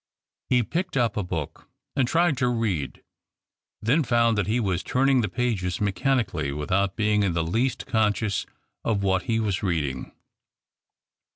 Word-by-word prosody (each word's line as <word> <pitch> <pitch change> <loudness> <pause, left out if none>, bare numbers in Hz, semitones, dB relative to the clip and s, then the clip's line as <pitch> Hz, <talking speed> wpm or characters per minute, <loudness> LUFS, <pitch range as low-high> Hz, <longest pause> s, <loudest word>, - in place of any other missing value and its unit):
He 125 -1 +4
picked 175 - -2
up 120 -4 +1
a 105 - 0
book 85 -5 -5 0.3
and 135 -3 +2
tried 170 +2 +3
to 125 -1 +1
read 110 - -2 0.4
— - - -65
then 130 +9 +3
found 115 -2 +3
that 105 -2 0
he 115 +4 +1
was 95 -5 0
turning 135 0 +2
the 105 - -1
pages 110 -8 -1
mechanic 105 +2 +1
ally, 75 -4 -2
without 95 +7 0
being 105 -1 +2
in 95 -4 +1
the 80 -1 0
least 115 +10 -1
conscious 105 -2 0 0.4
of 105 -3 0
w^hat 95 -1 +2
he 115 -2 +1
was 105 -4 -1
reading. 75 -9 -2
105 Hz, 165 wpm, -25 LUFS, 95-125 Hz, 0.4 s, He